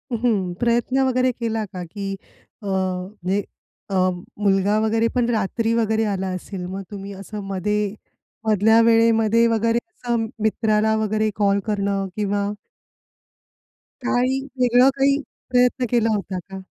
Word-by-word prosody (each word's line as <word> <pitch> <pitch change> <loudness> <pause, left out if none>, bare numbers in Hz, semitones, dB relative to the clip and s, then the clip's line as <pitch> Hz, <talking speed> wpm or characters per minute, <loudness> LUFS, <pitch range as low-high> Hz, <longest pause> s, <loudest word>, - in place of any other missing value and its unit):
हं. 215 -6 0
प्रयत्न 240 +2 +1
वगैरे 255 0 +2
केला 225 -2 -2
का? 180 -1 -5
की 195 -2 -4 0.5
अ, 205 - -7
म्हणजे 190 +1 -2 0.5
अ, - - 0 0.4
मुलगा 200 +1 +2
वगैरे 225 +1 +2
पण 245 -1 +2
रात्री 225 +1 0
वगैरे 220 -1 +1
आला 195 -2 -1
असेल 185 0 -6
मग 190 +1 -5
तुम्ही 200 0 -7
असं 200 +2 -7
मध्ये 200 +1 -1 0.5
मधल्या 220 +2 +5
वेळेमध्ये 230 0 +4
वगैरे 230 +1 +2
असं 235 -6 -2 0.2
मित्राला 220 0 +2
वगैरे 215 0 0
कॉल 200 -1 +2
करणं 200 -2 0
किंवा 205 -1 -1 1.6
काही 255 +1 +1 0.2
वेगळं 250 +1 +5
काही 275 +1 +3 0.3
प्रयत्न 250 +1 +3
केला 230 -1 +2
होता 195 -2 -4
का? 195 +2 -9
215 Hz, 130 wpm, -22 LUFS, 200-230 Hz, 1.6 s, मधल्या